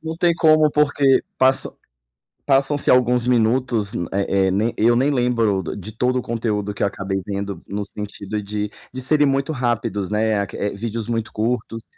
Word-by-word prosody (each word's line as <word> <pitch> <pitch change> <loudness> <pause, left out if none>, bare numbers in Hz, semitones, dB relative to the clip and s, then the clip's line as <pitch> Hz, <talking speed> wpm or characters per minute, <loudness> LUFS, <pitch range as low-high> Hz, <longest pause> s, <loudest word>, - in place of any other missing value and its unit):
Não 160 0 -5
tem 170 -1 +2
como, 155 -2 +4
porque 145 -2 +3 0.2
passam 130 0 +3 0.7
passam-se 140 +1 +2
alguns 125 -1 +3
minutos, 115 -3 +1
m 85 - -3
eh 95 -1 +1
eh, - - +1
nem 110 +5 0
eu 120 +2 +3
nem 135 +4 +2
lembro 115 -6 +1
do - - -5
de 105 +3 -8
todo 125 +3 0
o - - -3
conteúdo 110 -3 -2
que - - -9
eu - - +3
acabei 95 -1 -3
vendo 100 -2 -4
no 100 +1 -3
sentido 105 0 -5
de 105 0 -3 0.2
de 130 - -5
serem 145 +2 +3
muito 135 +2 0
rápidos, 110 -6 -2
né, 110 -1 +1
a - - -1
que - - -9
eh, 100 - -2
vídeos 110 +1 -4
muito 115 -1 -2
curtos. 115 0 -2
115 Hz, 190 wpm, -21 LUFS, 105-130 Hz, 0.7 s, como